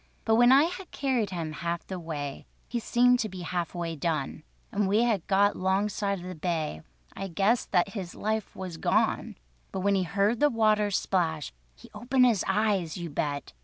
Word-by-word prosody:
But 225 - +3
when 240 +2 +6
I 275 +2 +7
had 360 +2 -4
carried 255 -6 0
him 170 -4 -4
half 170 +2 -3
the 190 -1 -5
way, 145 -4 -5 0.2
He 240 - -2
seemed 245 +2 +3
to 215 - -1
be 185 -1 -8
half 175 0 -3
way 170 -1 -3
done, 155 -2 -2 0.3
And 205 -1 +1
when - - -1
we 215 +4 +3
had 220 -7 0
got 200 +1 +3
'longside 200 +1 0
of - - -9
the 185 - -5
bay, 160 - -2 0.3
I 195 - -4
guessed 200 +7 +1
that 180 0 +3
his 195 -4 -6
life 220 0 -2
was 185 -3 -6
gone. - - +1 0.4
But 190 - -3
when 200 +1 +2
he 195 - +2
heard 200 +5 +1
the 295 - +5
water 215 -3 +2
splash, 165 - -1 0.2
He - - -16
opened 255 +1 +2
his 230 -6 +3
eyes—you 190 -5 0
bet! 145 - -3
195 Hz, 195 wpm, -28 LUFS, 170-220 Hz, 0.4 s, I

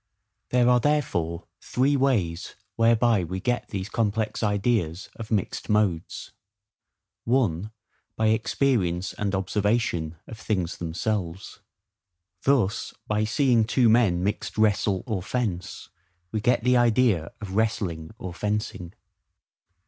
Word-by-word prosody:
There 125 -1 +3
are 125 0 +5
therefore 90 - 0 0.2
three 135 +3 +1
ways 105 -12 0 0.2
whereby 115 -2 +3
we 90 +3 -4
get 115 +1 -1
these 95 -1 -4
complex 110 -1 -1
ideas 100 -5 0
of 110 -2 -8
mixed 105 -5 -2
modes:—(1) 105 +1 -3 0.4
By 110 - +1
experience 110 -5 +1
and 100 -1 -2
OBSERVATION 95 -4 0
of 110 - -10
things 95 -7 -2
themselves: 90 +1 -3 0.8
thus, 125 -8 +1
by 105 0 0
seeing 120 0 +3
two 120 +1 +3
men 105 -7 +3
mixed 105 +3 -2
wrestle 105 -3 +2
or 105 -6 -2
fence, 100 -4 -3 0.4
we 110 - -2
get 120 +1 +2
the 125 0 +4
idea 115 -8 +3
of 100 -3 -6
wrestling 95 -7 -1
or 95 -8 -6
fencing. 105 -2 -3
105 Hz, 115 wpm, -25 LUFS, 95-115 Hz, 0.8 s, are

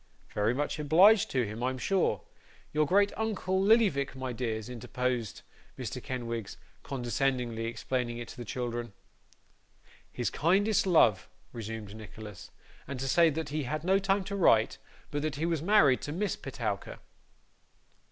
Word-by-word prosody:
'Very 105 +4 +1
much 145 +2 -2
obliged 190 +9 +6
to 130 -3 +1
him, 110 +3 -6
I'm 130 +1 -1
sure. 175 - +1 0.5
Your 150 0 +2
great 200 +4 +4
uncle, 190 -4 -1
Lillyvick, 195 - +3
my 130 -1 -4
dears!' 110 -3 -3
interposed 125 -2 -3 0.3
Mr. - - -5
Kenwigs, 115 -4 -4 0.2
condescendingly 125 -2 -1
explaining 120 +1 -2
it 120 - -6
to - - -10
the 120 - -5
children. 120 0 -4 1.2
'His 120 - -2
kindest 195 +6 +2
love,' 115 - +4 0.2
resumed 110 -3 -6
Nicholas; 110 -3 -10 0.4
'and 135 -1 -5
to 135 - -2
say 165 +5 +5
that 160 +1 -3
he 150 +1 -2
had 155 +4 -3
no 190 +2 +3
time 195 0 +1
to 200 +1 -5
write, 115 - +3 0.3
but 145 -1 -2
that 155 -1 -2
he 155 +4 -2
was 165 -3 0
married 165 -8 +4
to 145 - -5
Miss 195 +6 -1
Petowker. - - -4
135 Hz, 150 wpm, -30 LUFS, 120-175 Hz, 1.2 s, obliged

